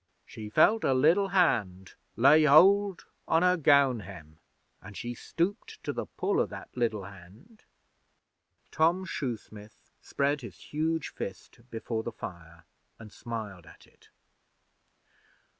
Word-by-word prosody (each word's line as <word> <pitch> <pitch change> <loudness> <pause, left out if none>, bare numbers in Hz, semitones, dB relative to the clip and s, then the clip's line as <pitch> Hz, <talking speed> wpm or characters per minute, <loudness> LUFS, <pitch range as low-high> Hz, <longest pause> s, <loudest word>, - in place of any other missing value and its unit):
She 110 -1 -9
felt 220 - +3
a 135 - +2
liddle 165 +9 +3
hand 110 - 0 0.2
lay 150 +6 +5
hold 195 +6 +5 0.2
on 165 +2 +2
her 180 0 +4
gown 140 -6 +3
hem, 85 -5 -12 0.4
an' 100 +1 -12
she 120 +6 -5
stooped 200 - -4
to - - -3
the - - -5
pull 405 +1 -1
o' - - +1
that - - -11
liddle 115 -5 -1
hand.' 100 - -15 1.1
Tom 170 +4 +1
Shoesmith 110 - -7
spread 140 0 -1
his 120 - -10
huge 160 +1 -3
fist 95 - -8
before 115 0 -4
the 115 - -6
fire 85 -5 -10 0.3
and 110 -2 -13
smiled 105 -8 -7
at - - -17
it. - - -26
125 Hz, 130 wpm, -28 LUFS, 105-165 Hz, 1.1 s, lay